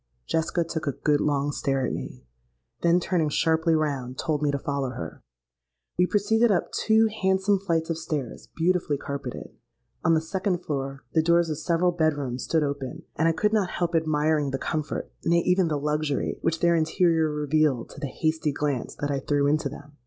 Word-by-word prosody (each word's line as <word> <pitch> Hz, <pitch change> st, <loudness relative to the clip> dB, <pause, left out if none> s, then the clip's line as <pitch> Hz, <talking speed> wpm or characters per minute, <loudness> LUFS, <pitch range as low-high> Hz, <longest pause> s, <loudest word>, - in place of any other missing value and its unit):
Jessica 165 Hz, +1 st, 0 dB
took 160 Hz, -2 st, -4 dB
a 140 Hz, -, +1 dB
good 150 Hz, -1 st, +3 dB
long 145 Hz, -1 st, +1 dB
stare 135 Hz, -2 st, 0 dB
at -, -, -2 dB
me, 65 Hz, 0 st, -7 dB, 0.6 s
then 170 Hz, +1 st, +4 dB
turning 170 Hz, -3 st, 0 dB
sharply 160 Hz, +2 st, +2 dB
round, 135 Hz, -5 st, -2 dB
told 155 Hz, -3 st, -1 dB
me 150 Hz, -, +2 dB
to 140 Hz, -, 0 dB
follow 140 Hz, -1 st, -2 dB
her. 85 Hz, -10 st, -7 dB, 0.7 s
We 180 Hz, +1 st, +3 dB
proceeded 220 Hz, +4 st, +3 dB
up 180 Hz, -, 0 dB
two 220 Hz, 0 st, +3 dB, 0.2 s
handsome 190 Hz, +1 st, +2 dB
flights 165 Hz, -4 st, -1 dB
of 165 Hz, -, -2 dB
stairs, 150 Hz, -6 st, -4 dB
beautifully, 165 Hz, -3 st, +1 dB
carpetted. 140 Hz, -2 st, -6 dB, 0.5 s
On 165 Hz, -, +4 dB
the -, -, +3 dB
second 185 Hz, +1 st, -2 dB
floor, 135 Hz, -2 st, -3 dB
the 160 Hz, -, +4 dB
doors 170 Hz, 0 st, +3 dB
of 150 Hz, -, -3 dB
several 170 Hz, +3 st, +2 dB
bed 160 Hz, -3 st, +1 dB
rooms 130 Hz, -3 st, -3 dB
stood 160 Hz, -1 st, +1 dB
open; 140 Hz, -2 st, -4 dB
and 160 Hz, -, +2 dB
I -, -, +5 dB
could 210 Hz, +6 st, +1 dB
not 205 Hz, -5 st, +2 dB
help 175 Hz, -1 st, -2 dB
admiring 155 Hz, -2 st, +1 dB
the 135 Hz, -, -2 dB
comfort—nay, 160 Hz, +3 st, -1 dB
even 180 Hz, -1 st, +3 dB
the 150 Hz, -2 st, 0 dB
luxury, 150 Hz, 0 st, -1 dB
which 165 Hz, 0 st, 0 dB
their 170 Hz, 0 st, +4 dB
interior 160 Hz, 0 st, +2 dB
revealed 150 Hz, -4 st, +1 dB
to -, -, -11 dB
the 145 Hz, -, -3 dB
hasty 155 Hz, +2 st, -1 dB
glance 140 Hz, -3 st, -2 dB
that 145 Hz, 0 st, -2 dB
I 140 Hz, -, 0 dB
threw 145 Hz, +1 st, +1 dB
into 150 Hz, 0 st, +1 dB
them. 145 Hz, +1 st, -12 dB
155 Hz, 190 wpm, -26 LUFS, 145-170 Hz, 0.7 s, I